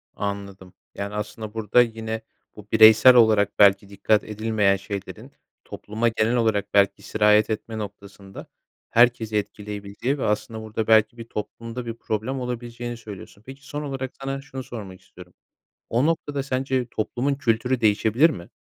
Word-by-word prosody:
Anladım. 100 -2 -6 0.2
Yani, 100 +1 -5
aslında, 105 0 -6
burada 110 +2 +3
yine 110 -1 -3 0.3
bu 105 -1 -13
bireysel 110 +3 +8
olarak 110 -4 +4
belki 100 -1 +5
dikkat 100 +1 +1
edilmeyen 105 -2 +1
şeylerin 100 0 -7 0.3
topluma 110 +3 -3
genel 115 +1 0
olarak, 105 -4 0
belki, 100 -1 +3
sirayet 105 0 +3
etme 110 +1 -4
noktasında 100 -2 -9 0.4
herkesi 115 -2 +3
etkileyebileceği 105 +5 -4
ve 135 - -4
aslında 110 +1 -2
burada 110 0 -4
belki 110 +1 +4
bir 115 - -8
toplumda 115 +3 -6
bir 115 - -4
problem 115 +4 -3
olabileceğini 120 -1 -5
söylüyorsun. 100 -2 -11
Peki 135 +2 -12
son 145 +1 -5
olarak 135 -2 -4
sana 135 0 -4
şunu 135 -1 -8
sormak 100 -7 -9
istiyorum. 90 -1 -16 0.6
O 120 +5 +2
noktada 145 -4 -1
sence 130 -1 -1
toplumun 125 +6 -1
kültürü 125 -1 0
değişebilir 110 +8 +3
mi? 85 - -8
110 Hz, 145 wpm, -23 LUFS, 105-125 Hz, 0.6 s, bireysel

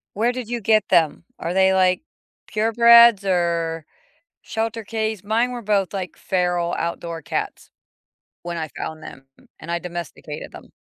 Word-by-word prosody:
Where 230 +4 +2
did 245 -3 -6
you 240 -1 -2
get 215 -1 +2
them? 160 0 +2 0.2
Are 170 +2 -3
they, 190 0 +4
like, 185 +2 +3 0.5
purebreds 235 -1 +6
or 170 -3 0 0.6
shelter 225 0 -3
case? 220 -2 -3
Mine 230 +4 +1
were 240 -1 -6
both, 200 -2 0
like, 185 -3 -5
feral, 180 -2 0
outdoor 170 -1 -4
cats - - -4 0.7
when 175 0 -4
I 160 -1 -3
found 160 0 -5
them 135 0 -11 0.3
and 165 - -7
I 170 - 0
domesticated 170 -3 -7
them. - - -13
190 Hz, 150 wpm, -22 LUFS, 170-220 Hz, 0.7 s, purebreds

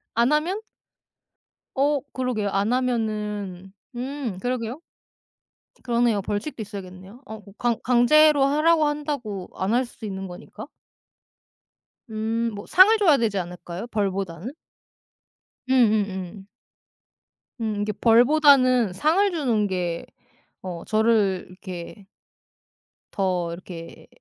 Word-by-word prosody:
안 235 +5 +3
하면? 335 +7 +1 1.2
어 285 +1 +2
그러게요. 245 -6 -1
안 200 +5 0
하면은 210 -6 -2 0.2
음 255 -5 -4
그러게요. 245 +3 -3 1.0
그러네요. 235 -4 +1
벌칙도 210 +6 -4
있어야겠네요. 195 +2 -9
어 220 -4 -9 0.2
강 240 -2 0
강제로 280 +4 +5
하라고 305 +3 +3
한다고 285 -10 -3
안 190 +4 -1
할 250 +1 +2
수도 230 -1 -11
있는 195 -1 -5
거니까. 175 -1 -10 1.4
음 225 +1 -1
뭐 205 - -8
상을 385 +5 +7
줘야 335 -9 +4
되지 215 -4 0
않을까요, 175 +3 -6
벌보다는? 195 - -3 1.2
음음음. 205 -6 +1 1.1
음 215 -2 -2
이게 210 +1 -1
벌보다는 250 0 +4
상을 355 - +2
주는 240 -11 0
게 175 -3 -3 0.6
어 180 -3 -6
저를 215 -4 +2
이렇게 185 +1 -9 1.1
더 180 -3 -1
이렇게 170 -1 -10
220 Hz, 225 characters per minute, -24 LUFS, 195-255 Hz, 1.4 s, 상을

